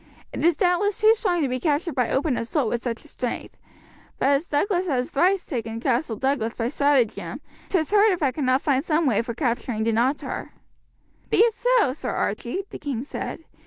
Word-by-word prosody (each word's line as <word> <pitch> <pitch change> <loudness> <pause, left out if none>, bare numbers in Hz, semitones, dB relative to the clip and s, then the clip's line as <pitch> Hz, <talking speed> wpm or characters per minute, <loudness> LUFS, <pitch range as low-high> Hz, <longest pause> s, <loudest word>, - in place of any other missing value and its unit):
It - - -4
is 335 -2 +4
doubtless 365 +3 +1
too 435 +1 +6
strong 365 -7 0
to - - +1
be 255 0 -2
captured 305 +4 0
by 250 -3 0
open 275 0 +1
assault 235 +1 -1
with 240 +1 -2
such 240 +2 -4
a - - -13
strength, 250 -5 -5 0.6
but 270 - +2
as 285 +4 +2
Douglas 360 +5 0
has 255 -5 -1
thrice 365 +6 +2
taken 225 -4 -4
Castle 245 0 0
Douglas 245 -1 -1
by 230 0 -1
stratagem, 280 -5 +1 0.3
'tis 340 -4 0
hard 420 +1 +5
if 355 -4 -1
I 270 - +3
cannot 260 -1 +1
find 275 -2 +2
some 320 0 +1
way 235 -7 +2
for 235 -1 -5
capturing 235 -3 -1
Dunottar." 235 +5 -1 0.8
"Be - - +1
it 460 0 +5
so, 485 - +2
Sir 295 - -5
Archie," 240 - -2
the - - -7
king 260 -5 -3
said. 295 - -6
280 Hz, 195 wpm, -24 LUFS, 245-345 Hz, 0.8 s, too